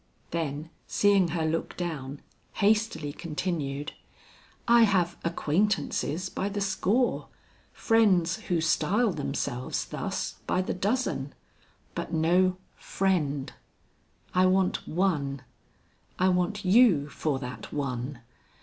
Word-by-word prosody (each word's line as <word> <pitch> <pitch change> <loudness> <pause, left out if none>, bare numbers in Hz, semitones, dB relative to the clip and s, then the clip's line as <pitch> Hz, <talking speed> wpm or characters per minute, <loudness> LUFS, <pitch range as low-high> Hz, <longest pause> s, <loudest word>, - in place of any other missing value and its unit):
Then 160 -1 -3 0.2
seeing 200 -3 +3
her 160 -1 -1
look 160 +1 -2
down, 145 -6 -5 0.3
hastily 210 -8 +1
continued, 150 -4 -3 0.8
"I 235 0 +6
have 190 -6 +3
acquaintances 170 0 0
by 195 +1 -3
the 205 0 -3
score 200 +5 +1 0.4
friends 200 -7 +3
who 175 -3 +1
style 195 +8 +2
themselves 135 -4 -3
thus, - - -4
by 185 - +1
the - - -2
dozen, 195 - -1 0.6
but - - -4
no 180 +3 +3 0.2
friend. 150 -8 -1 0.8
I 185 0 +4
want 185 0 +1
one; 150 -7 0 0.7
I 185 +1 +3
want 185 +3 0
you 185 - +5
for 150 -1 -2
that 125 -1 -7
one. 130 -2 -3
175 Hz, 105 wpm, -28 LUFS, 145-195 Hz, 0.8 s, I